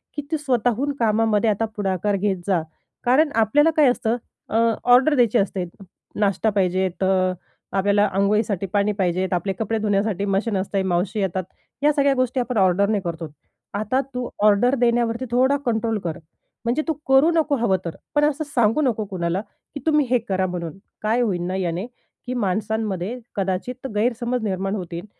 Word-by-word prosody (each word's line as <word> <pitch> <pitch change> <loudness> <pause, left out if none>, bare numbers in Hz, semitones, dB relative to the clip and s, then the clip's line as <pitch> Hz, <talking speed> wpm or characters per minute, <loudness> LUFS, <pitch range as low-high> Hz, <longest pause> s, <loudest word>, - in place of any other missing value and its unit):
की 295 - -2
तू 320 - +1
स्वतःहून 255 -1 0
कामामध्ये 220 -1 +2
आता 215 +2 +1
पुढाकार 200 0 0
घेत 195 0 0
जा. 185 -4 +2 0.4
कारण 280 +6 +4
आपल्याला 230 +8 +4
काय 300 -3 +6
असतं, 240 -1 0 0.3
अ, - - -3 0.4
ऑर्डर 270 +5 +5
द्यायची 240 -3 +3
असते. 195 -3 0 0.5
नाश्ता 205 +1 +2
पाहिजे, 190 -2 +1 0.2
अ, 185 -1 +2 0.4
आपल्याला 205 +1 +3
अंघोळीसाठी 200 0 +1
पाणी 205 0 +2
पाहिजे, 185 0 +1
आपले 185 +2 0
कपडे 225 0 -1
धुण्यासाठी 205 -1 0
मशीन 200 +2 0
असतेय, 190 +1 -1
मावशी 190 +3 -1
येतात. 190 -1 -1 0.4
या 300 - +5
सगळ्या 280 -1 +3
गोष्टी 255 0 0
आपण 245 -1 -2
ऑर्डरने 200 +2 +3
करतो. 170 -2 -5 0.5
आता 215 +6 0
तू 250 -1 -3
ऑर्डर 215 +5 +4
देण्यावरती 235 0 +1
थोडा 260 +3 +3
कंट्रोल 225 -2 0
कर. 165 -3 -3 0.5
म्हणजे 245 +6 +1
तू 320 - +1
करू 270 +4 +5
नको 310 -3 +2
हवं 225 -6 +2
तर, 170 - -4 0.2
पण 295 - +4
असं 300 +1 0
सांगू 240 -1 +2
नको 230 -6 0
कुणाला, 180 -1 -2 0.3
की - - -3
तुम्ही 300 -2 +3
हे 250 - +4
करा 190 -1 +1
म्हणून. 175 -2 -5 0.2
काय 225 +3 +1
होईल 195 -7 0
ना 185 - -2
याने, 180 0 -2 0.4
की 250 - -3
माणसांमध्ये 215 0 -2 0.2
कदाचित 200 +7 -3
गैरसमज 240 +2 0
निर्माण 195 -1 -1
होतील, 175 -2 -6
215 Hz, 165 wpm, -22 LUFS, 190-245 Hz, 0.5 s, काय